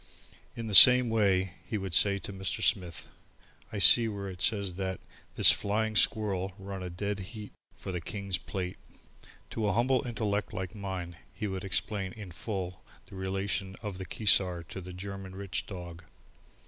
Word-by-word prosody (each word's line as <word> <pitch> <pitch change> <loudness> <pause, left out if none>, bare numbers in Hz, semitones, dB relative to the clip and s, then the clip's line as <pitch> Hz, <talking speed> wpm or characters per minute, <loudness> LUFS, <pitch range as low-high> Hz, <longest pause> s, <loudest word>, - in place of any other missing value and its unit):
In 115 - -6
the 110 - -5
same 125 +3 +11
way 95 -4 +1
he 110 - -4
would 95 -3 -6
say 100 +3 +3
to 100 - -8
Mr. 95 +3 -3
Smith: 90 -6 -1 0.6
"I 105 - -5
see 100 +6 +6
where 100 -2 -5
it 90 -1 -9
says 100 -2 0
that 95 0 -4 0.4
this - - +9
'Flying 110 +2 -1
Squirl' 100 -3 +1
run 95 -1 -7
a 90 - -5
dead 100 +3 -4
heat 105 +2 -9 0.2
for 95 - -8
the 90 -1 -4
King's 100 +1 -4
Plate." 90 -1 -6 0.7
To 110 -2 -2
a 100 - +1
humble 125 +4 +1
intellect 105 -3 -3
like 90 -1 -5
mine 95 -4 -6
he - - -6
would 95 -2 -4
explain 95 0 -2
in 100 -5 -10
full 90 -1 -6 0.3
the - - -10
relations 95 0 -3
of 100 -3 -6
the 95 - -6
Keesar 90 -4 +1
to 95 - -7
the 90 +1 -10
German 95 +1 -8
Rich 100 -1 -5
Dog. 85 -3 -9
95 Hz, 175 wpm, -29 LUFS, 95-105 Hz, 0.7 s, same